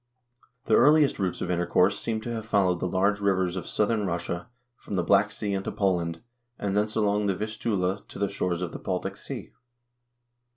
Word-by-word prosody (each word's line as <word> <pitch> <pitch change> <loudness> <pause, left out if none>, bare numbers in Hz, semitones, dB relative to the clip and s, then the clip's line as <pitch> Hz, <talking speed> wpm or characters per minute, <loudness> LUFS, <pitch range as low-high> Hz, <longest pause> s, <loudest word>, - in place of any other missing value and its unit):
The 110 - +1
earliest 150 +2 +5
routes 95 -2 -1
of 90 - -1
intercourse 90 +3 +2
seem 110 -1 -2
to 120 +1 -4
have 110 -1 -5
fol 100 -3 +3
lowed 90 - -2
the 90 - -1
large 100 +3 +1
rivers 95 -3 +1
of 90 - -5
southern 105 -1 +1
Russia 85 0 -3 0.3
from 105 - -7
the 90 - +1
Black - - +4
Sea 100 -2 -3
into 95 0 -2
Poland, 85 -5 0 0.4
and 100 -1 -2
thence 105 +1 0
along 105 -1 +2
the 95 - +1
Vistula 105 -2 -2
to - - -11
the 100 - +1
shores 90 -2 -2
of 90 - -4
the - - -7
Baltic 90 -1 -3
Sea. - - -7
100 Hz, 195 wpm, -27 LUFS, 90-105 Hz, 0.4 s, earliest